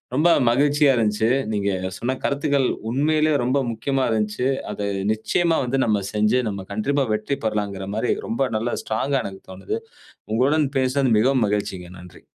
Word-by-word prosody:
ரொம்ப 155 +5 +4 0.2
மகிழ்ச்சியா 145 +3 +3
இருஞ்ச்சு. 110 0 +1 0.2
நீங்க 100 -1 0 0.3
சொன்ன 130 +2 -2
கருத்துக்கள் 140 -2 +1 0.2
உண்மையிலேயே 155 +4 +2
ரொம்ப 130 +3 +1
முக்கியமா 135 +4 -1
இருஞ்சு. 110 +3 0 0.2
அதை 100 -1 -3 0.3
நிச்சயமா 165 +9 +1
வந்து 135 +2 0
நாம 105 -3 +1
செஞ்சு 105 +4 +2
நாம 100 -2 -6
கண்டிப்பா 135 +7 0
வெற்றி 110 +6 -2
பெறலாங்கிற 100 -3 -2
மாரி, 115 +3 0 0.2
ரொம்ப 130 +3 0
நல்ல 115 +3 -2
ஸ்ட்ராங்கா 135 +5 0
எனக்கு 95 -1 -7
தோணுது. 95 +1 -4 0.6
உங்களுடன் 140 +6 +2
பேசினது 130 0 +1
மிகவும் 130 +1 +3
மகிழ்ச்சிங்க. 100 -4 -3
நன்றி. 90 0 -14
120 Hz, 145 wpm, -22 LUFS, 105-140 Hz, 0.6 s, ரொம்ப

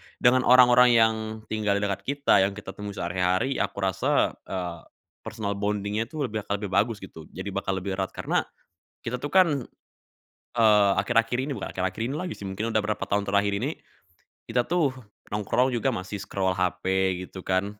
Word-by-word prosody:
dengan 125 +1 +3
orang-orang 125 -1 +7
yang 110 -1 +5 0.4
tinggal 105 -2 +1
di 100 - -1
dekat 100 -2 -1
kita, 140 +1 +3
yang 95 +1 +1
kita 100 -2 -8
temui 100 +1 -7
sehari-hari, 90 +8 0
aku 100 - -2
rasa, 95 -2 +2 0.2
eee, 90 -3 -4 0.5
personal 100 -2 -3
bonding-nya 105 +2 -1
tuh 155 +3 -4
lebih 110 - -2
aka 100 - 0
lebih 100 -1 -5
bagus 105 +2 +1
gitu, 80 -4 -11
jadi 95 +3 -5
bakal 95 0 -2
lebih 95 0 -4
erat. 95 - -3
Karena - - -1 0.6
kita 115 - -2
tuh 145 - -3
kan, 165 -6 +4 1.0
eee, 105 -3 +5
akhir-akhir 120 0 +1
ini 135 +2 -2
bukan - - -5
akhir-akhir 95 +3 -3
ini 125 +4 -2
lagi 180 0 -4
sih, - - -13
mungkin 105 +4 -3
udah 110 - +3
berapa 105 +1 -3
tahun 100 0 +1
terakhir 100 0 +1
ini, 145 +5 -2 0.7
kita 120 +1 -1
tuh 165 -5 +2 0.4
nongkrong 105 +5 +1
juga 120 +2 -1
masih 95 +1 -5
scroll 95 -1 -1
HP 90 -1 -1 0.4
gitu 95 - -10
kan. 100 +3 -1
105 Hz, 180 wpm, -26 LUFS, 95-120 Hz, 1.0 s, orang-orang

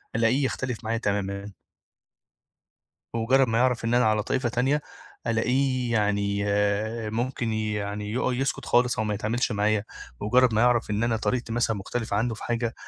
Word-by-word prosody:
ألاقيه 120 +5 +2
يختلف 125 -3 -3
معايا 115 +1 -1
تمامًا. 100 -1 -2 1.6
بمُجرّد 130 +3 +3
ما 115 +1 +1
يعرف 125 -2 +2
إن 115 +1 +1
أنا 125 -1 +4
على 110 -1 +2
طائفة 130 +2 -1
تانية، 135 +5 +1 0.4
ألاقيه 125 +2 +1
يعني 100 -1 +1 0.7
ممكن 120 0 -2
يعني 105 -1 -3
يق 125 - -1
يسكت 135 +2 -1
خالص 120 -1 +2
أو 110 - +1
ما 105 -1 -1
يتعاملش 110 +4 -1
معايا، 105 0 +1 0.4
بمُجرّد 125 +2 +3
ما 110 - +3
يعرف 120 -3 +3
إن 105 +2 0
أنا 115 -1 +1
طريقتي 120 +1 -2
مثلًا 115 -2 +1
مختلفة 105 +2 -3
عنّه 115 +1 0
في - - -9
حاجة 120 -1 -1
115 Hz, 160 wpm, -26 LUFS, 105-125 Hz, 1.6 s, أنا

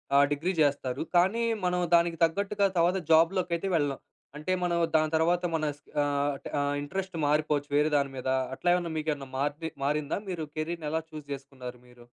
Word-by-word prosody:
ఆహ్, 140 0 +7
డిగ్రీ 175 +6 -1
చేస్తారు. 140 -3 +1 0.2
కానీ 200 +7 +3 0.2
మనం 180 0 +1 0.2
దానికి 170 -1 +2
తగ్గట్టుగా 200 +3 0
తర్వాత 175 +3 +3
జాబ్‌ 165 +2 +6
లోకైతే 175 +1 -1
వెళ్ళం, 145 -3 0 0.4
అంటే 155 +5 -3
మనం 175 -1 +1 0.2
దాని 155 0 +3
తర్వాత 170 +3 +2
మన 155 - -1 0.4
ఆహ్, 145 0 0 0.2
ఆహ్, 145 0 0
ఇంట్రెస్ట్ 190 +5 -4
మారిపోవచ్చు, 150 -1 +1
వేరే 150 +1 +3
దాని 140 -1 0
మీద. 130 - -5 0.3
అట్లా 175 - 0
ఏమన్నా 170 -2 -2
మీకేమన్నా 150 -3 -2
మార్ 145 +1 0 0.3
మారిందా? 150 +3 0
మీరు 170 -4 -3
కెరీర్‌ని 155 0 -3
ఎలా 160 - 0
చూజ్ 155 -2 -8
చేసుకున్నారు 130 -3 -9
మీరు? 120 -1 -17
155 Hz, 165 wpm, -28 LUFS, 145-175 Hz, 0.4 s, ఆహ్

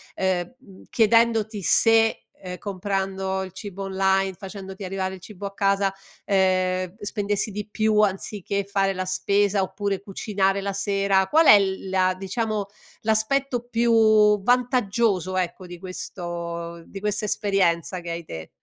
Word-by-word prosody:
ehm, 185 +3 -1
mhmm, 200 -8 -17
chiedendoti 225 -1 +3
se, 225 +4 +3 0.2
ehm, 180 -1 -6
comprando 190 -1 -2
il 185 - -8
cibo 195 0 -7
online, 190 0 +1
facendoti 190 +1 -9
arrivare 190 0 -3
il - - -13
cibo 200 +1 -9
a 200 - -5
casa, 195 -1 +1 0.3
ehm, 185 -1 +1
spendessi 205 0 -2
di 210 +1 -5
più 215 0 +1
anziché 200 0 0
fare 195 0 0
la 185 0 -3
spesa 200 +2 +1
oppure 195 +1 -2
cucinare 195 -1 -1
la 200 0 -3
sera? 195 -1 +1
Qual 320 +9 +4
è 205 - +9
l 190 -1 -2
la 185 -1 +2
diciamo, 210 +1 -2 0.3
l'aspetto 240 +3 0
più 220 -3 +4
vantaggioso, 230 -5 +1
ecco, 180 0 -2
di 175 - -9
questo 170 -2 -6
di 195 - -9
questa 210 +1 -1
esperienza 190 -4 0
che 170 -1 -8
hai 170 0 -4
te? 80 - -8
195 Hz, 140 wpm, -24 LUFS, 185-210 Hz, 0.3 s, è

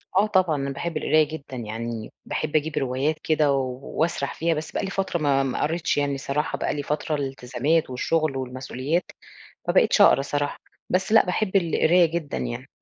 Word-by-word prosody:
آه 200 +3 +4
طبعًا، 185 -6 +2
أنا 140 -1 -2
باحب 155 +4 -3
القراية 155 0 +3
جدًا. 145 -3 -8
يعني 115 0 -5
باحب 155 0 -3
أجيب 155 0 +1
روايات 135 +4 0
كده 155 -2 +3
و 130 -2 -2
واسرح 160 -3 -1
فيها 165 +1 0
بس 155 0 -5
بقى - - -2
لي 195 - -2
فترة 190 -3 -1
ما 140 -3 +2
ما 130 - -2
قَريتش 160 +1 0
يعني 140 -1 0
صراحة، 140 +3 -2
بقى - - -1
لي 145 - -3
فترة 150 +2 -1
الالتزامات 135 +2 -1
والشغل 150 +2 0
والمسؤوليات، 130 +5 -3 0.6
ما - - +1
بقيتش - - +4
أقرا 135 - +7
صراحة، 145 +1 -2 0.3
بس 190 +4 +1
لأ، 225 - +6
باحب 190 +2 0
القراية 170 0 +4
جدًا 160 - -3
يعني. - - -5
150 Hz, 185 wpm, -24 LUFS, 135-165 Hz, 0.6 s, أقرا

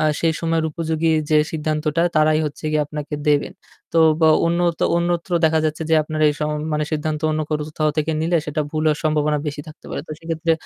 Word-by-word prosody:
আ - - +1 0.2
সেই 165 -1 +2
সময়ের 165 -1 0
উপযোগী 160 0 -1 0.2
যে 155 - +5 0.2
সিদ্ধান্তটা 155 +1 -1
তারাই 155 0 +4
হচ্ছে 150 - -8
গিয়ে 150 -1 +2
আপনাকে 150 0 -5
দেবেন। 145 -1 +2 0.4
তো 165 - +2 0.2
বা 160 - +5 0.2
অন্য 170 +1 +1 0.4
অন্যত্র 170 +1 -1
দেখা 160 0 +3
যাচ্ছে 155 +1 -1
যে - - +5
আপনার 155 0 -4
এই - - +2
সম 150 0 0 0.2
মানে 150 0 0
সিদ্ধান্ত 155 0 -2
অন্য 155 0 -1
কোথাও 150 -1 -1
কোথাও 155 0 0
থেকে 155 +1 0
নিলে 170 +2 +1
সেটা 150 +1 -2
ভুল 155 0 -2
হওয়ার 150 -1 +2
সম্ভাবনা 150 -1 +1
বেশি 145 0 -4
থাকতে 155 - -14
পারে। - - -3
তো - - -12
সেক্ষেত্রে 165 0 -1
155 Hz, 210 wpm, -21 LUFS, 150-160 Hz, 0.4 s, যে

